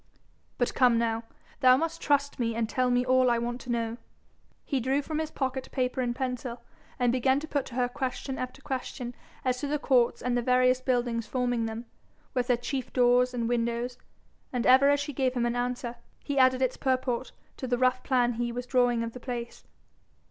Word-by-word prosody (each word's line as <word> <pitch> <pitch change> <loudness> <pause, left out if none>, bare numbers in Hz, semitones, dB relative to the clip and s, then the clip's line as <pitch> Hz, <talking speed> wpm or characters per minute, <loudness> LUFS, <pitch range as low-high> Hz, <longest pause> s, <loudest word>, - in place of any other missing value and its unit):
'But 245 - 0
come 250 -3 +4
now, 225 0 0 0.3
thou 255 -2 +6
must 330 +2 -2
trust 285 -1 +1
me, 230 -2 0
and 230 -1 0
tell 255 +2 +1
me 245 0 +2
all 255 0 +4
I 235 - +3
want 240 +1 -3
to 245 - -5
know.' 230 -1 -1 0.7
He 275 - 0
drew 265 +3 +1
from 310 +1 -3
his 315 -1 -2
pocket 265 -3 -3
paper 255 0 -1
and 240 -1 -1
pencil, 250 -2 -4 0.3
and 245 -2 +2
began 260 +2 +2
to 310 - -7
put 285 -4 -1
to 240 - -10
her 250 -1 +2
question 260 +1 -4
after 255 +2 -6
question 255 -3 -4 0.3
as 250 -1 +1
to 285 - -3
the 300 +1 0
courts 255 -4 +2
and 250 0 0
the 245 - +2
various 255 +1 +3
buildings 240 -3 0
forming 245 -1 0
them, 225 +2 -6 0.5
with 250 -1 0
their 245 -2 +3
chief 260 +2 -4
doors 250 0 +4
and 235 -2 -2
windows, 240 +1 -1 0.5
and 245 -2 -1
ever 265 +2 +7
as 285 0 +3
she 290 0 -4
gave 260 0 0
him 240 -1 +1
an 240 0 0
answer, 245 -1 -2 0.3
he 280 -1 -1
added 260 0 +4
its 255 0 0
purport 255 -2 -1 0.3
to 260 - -4
the 245 0 +1
rough 255 0 +2
plan 245 -2 +2
he 240 +1 -2
was 245 +1 -4
drawing 245 -2 +2
of 230 0 -5
the 250 - -8
place. 240 -2 -6
250 Hz, 205 wpm, -28 LUFS, 240-260 Hz, 0.7 s, ever